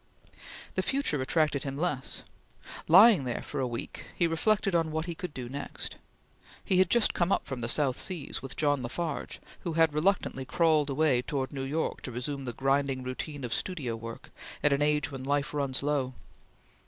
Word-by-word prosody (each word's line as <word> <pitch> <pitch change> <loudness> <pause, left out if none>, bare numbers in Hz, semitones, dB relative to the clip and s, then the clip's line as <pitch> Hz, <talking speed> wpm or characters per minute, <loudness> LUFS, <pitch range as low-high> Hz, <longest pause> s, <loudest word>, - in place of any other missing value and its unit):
The - - +1
future 265 - +1
attracted 150 +1 +1
him 135 0 -4
less. 150 -5 -1 0.6
Lying 195 - +8
there 125 -2 -3
for - - -5
a 130 - 0
week 120 -1 -6
he 175 - +2
reflected 195 +4 +1
on 165 -2 +2
what 160 +1 -2
he 175 - -3
could 180 0 -6
do 125 -3 -6
next. 140 +3 -5 0.7
He 185 - +3
had 185 -2 +4
just 235 -2 +4
come 175 +2 +1
up - - +1
from 130 -3 -5
the 115 - -1
South 135 +1 +2
Seas 175 -7 -2
with 135 -4 -7
John 145 -3 +2
La 120 - -3
Farge, 160 +1 -3 0.2
who 170 - -4
had 160 -1 +3
reluctantly 155 -4 +1
crawled 155 0 +2
away 135 -3 +2
towards 135 +1 -3
New 135 - -4
York 145 +4 -2
to 125 - -5
resume 135 +3 -3
the 120 - -4
grinding 135 0 0
routine 135 +3 -5
of 120 -2 -2
studio 140 -7 -2
work 115 0 -9 0.3
at 150 - +5
an 140 - +1
age 150 -1 +1
when 135 -1 -6
life 145 +2 0
runs 140 -2 -1
low. 140 -3 0
145 Hz, 190 wpm, -29 LUFS, 130-165 Hz, 0.7 s, Lying